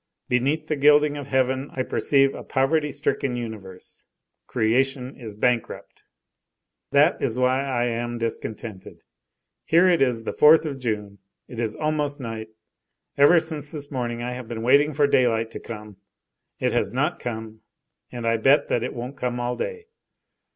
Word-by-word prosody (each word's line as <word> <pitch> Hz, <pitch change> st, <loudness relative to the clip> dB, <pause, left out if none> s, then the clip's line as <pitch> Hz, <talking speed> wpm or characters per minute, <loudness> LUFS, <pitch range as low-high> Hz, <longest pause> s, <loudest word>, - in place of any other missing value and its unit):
Beneath 140 Hz, +6 st, 0 dB
the 155 Hz, -, 0 dB
gilding 145 Hz, +1 st, +4 dB
of 145 Hz, -2 st, -6 dB
heaven 130 Hz, +1 st, 0 dB
I 130 Hz, -, -1 dB
perceive 135 Hz, +1 st, +2 dB
a -, -, -7 dB
poverty 150 Hz, +3 st, +1 dB
stricken 140 Hz, -3 st, -1 dB
universe. 105 Hz, -6 st, -8 dB, 0.4 s
Creation 130 Hz, +3 st, 0 dB
is 110 Hz, -5 st, -9 dB
bankrupt. 120 Hz, +2 st, -2 dB, 0.9 s
That -, -, +4 dB
is 115 Hz, -, -1 dB
why 130 Hz, +1 st, +2 dB
I 125 Hz, -3 st, -1 dB
am 120 Hz, 0 st, -2 dB
discontented. 110 Hz, -3 st, -6 dB, 0.6 s
Here 170 Hz, +3 st, +4 dB
it 175 Hz, -2 st, +3 dB
is 125 Hz, -4 st, +1 dB
the -, -, -3 dB
4th 155 Hz, +2 st, +6 dB
of 140 Hz, -3 st, -4 dB
June, 105 Hz, -5 st, -4 dB, 0.3 s
it 120 Hz, -, -9 dB
is 110 Hz, -2 st, -2 dB
almost 150 Hz, -2 st, -1 dB
night; 115 Hz, -3 st, -6 dB, 0.7 s
ever 145 Hz, +5 st, +6 dB
since 155 Hz, -3 st, -5 dB
this 145 Hz, -2 st, -6 dB
morning 120 Hz, -3 st, -3 dB
I 125 Hz, -, -3 dB
have 125 Hz, -1 st, -7 dB
been 115 Hz, -1 st, -5 dB
waiting 140 Hz, +5 st, +4 dB
for 145 Hz, 0 st, +2 dB
daylight 115 Hz, -5 st, +2 dB
to -, -, -7 dB
come; 105 Hz, -3 st, -9 dB, 0.6 s
it -, -, 0 dB
has 100 Hz, -, 0 dB
not 145 Hz, +8 st, -1 dB
come, 110 Hz, -2 st, -6 dB, 0.5 s
and 120 Hz, -2 st, -6 dB
I 115 Hz, 0 st, +2 dB
bet 135 Hz, +6 st, +3 dB
that 120 Hz, -, +1 dB
it 125 Hz, -, -4 dB
won't 125 Hz, +3 st, -6 dB
come 125 Hz, -1 st, -2 dB
all 120 Hz, 0 st, -2 dB
day. 455 Hz, -, -5 dB
125 Hz, 165 wpm, -24 LUFS, 115-145 Hz, 0.9 s, 4th